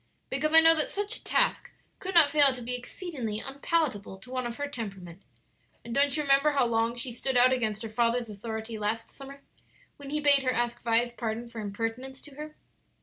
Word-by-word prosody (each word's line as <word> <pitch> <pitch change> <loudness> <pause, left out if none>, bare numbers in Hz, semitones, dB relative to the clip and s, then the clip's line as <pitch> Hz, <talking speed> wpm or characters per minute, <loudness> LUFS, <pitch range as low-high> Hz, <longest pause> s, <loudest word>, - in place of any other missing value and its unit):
"Because 300 +4 -1
I 325 0 +10
know 325 0 +8
that 305 - 0
such 410 +3 -3
a - - -18
task - - 0 0.3
could 380 -1 -5
not 315 -4 +7
fail 285 -3 +5
to 250 - -8
be 245 +2 -3
exceedingly 250 - -5
unpalatable 270 - -2
to 250 +6 -14
one 255 -1 -2
of 235 - -7
her 285 - -3
temperament; 195 -9 -8 0.6
and 235 - -6
don't 280 +1 +2
you 300 - 0
remember 280 +1 +3
how 275 -3 +2
long 230 0 0
she 240 +1 -4
stood 250 +2 -2
out 255 +1 +6
against 220 -3 -2
her - - -4
father's 235 +1 0
authority 220 +1 -6
last 220 +2 -2
summer 275 0 -12 0.5
when 280 -1 -10
he 300 +1 -1
bade 285 -2 +4
her 255 -1 0
ask 240 -1 -2
Vi's 235 +1 +1
pardon 235 0 -4
for 230 -2 -7
impertinence 225 +6 -5
to 295 - -14
her?" 305 +2 -9
250 Hz, 205 wpm, -28 LUFS, 225-285 Hz, 0.6 s, I